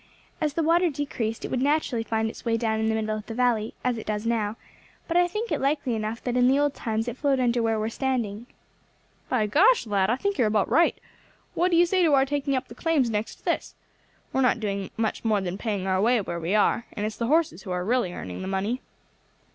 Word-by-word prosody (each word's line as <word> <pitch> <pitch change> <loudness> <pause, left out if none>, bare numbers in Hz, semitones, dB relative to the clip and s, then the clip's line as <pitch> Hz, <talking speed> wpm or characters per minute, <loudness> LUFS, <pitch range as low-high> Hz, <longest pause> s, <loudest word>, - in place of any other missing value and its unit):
As 300 -2 0
the 330 - +1
water 340 +2 +3
decreased 260 -6 -3
it - - -6
would 255 - 0
naturally 285 -4 +1
find 225 0 -1
its 220 - -8
way 230 -1 +1
down 220 -1 0
the - - +2
middle 215 -1 -1
of 215 0 -7
the 225 - -6
valley, 235 -3 +1
as 245 -2 0
it - - -9
does 210 0 -2
now; 220 -2 0 0.5
but 335 - -2
I 355 0 +5
think 425 +6 -4
it - - 0
likely 275 -2 0
enough 220 +1 -3
that 245 -1 -2
in 250 0 +4
the 265 +2 +4
old 290 -1 +2
times 225 -2 -2
it 240 +1 -4
flowed 275 -2 +1
under 240 -1 +2
where 225 -1 +1
we 215 - -1
are - - -1
standing." 235 -4 -2 0.8
"By 240 -5 +2
gosh, 370 - +4
lad, 200 -2 +1
I 240 - +3
think 400 +4 -2
you 245 - +4
are - - +3
about 210 -2 +1
right. 340 - +3 0.5
What 355 +2 +2
do 340 - +3
you 345 - +6
say 370 +2 +1
to 315 -5 +5
our 270 0 +4
taking 280 0 -1
up 260 0 -2
the - - -11
claims 300 -8 +1
next 210 0 -2
to - - -28
this? - - -1 0.6
We - - +1
are - - +3
not 250 -2 +3
doing 200 -3 -3
much 220 -1 -1
more 215 -2 +2
than 190 0 -4
paying 205 -5 -2
our 190 0 +1
way 240 +3 +3
where 170 -4 -4
we 170 +5 -1
are, 220 +3 +2
and 210 -2 -3
it's 215 0 -4
the 230 - -1
horses 305 - +2
who 190 - -10
are 180 0 -2
really 240 -4 +1
earning 90 - -7
the 185 - -5
money." 200 +6 -1
235 Hz, 255 wpm, -26 LUFS, 215-275 Hz, 0.8 s, you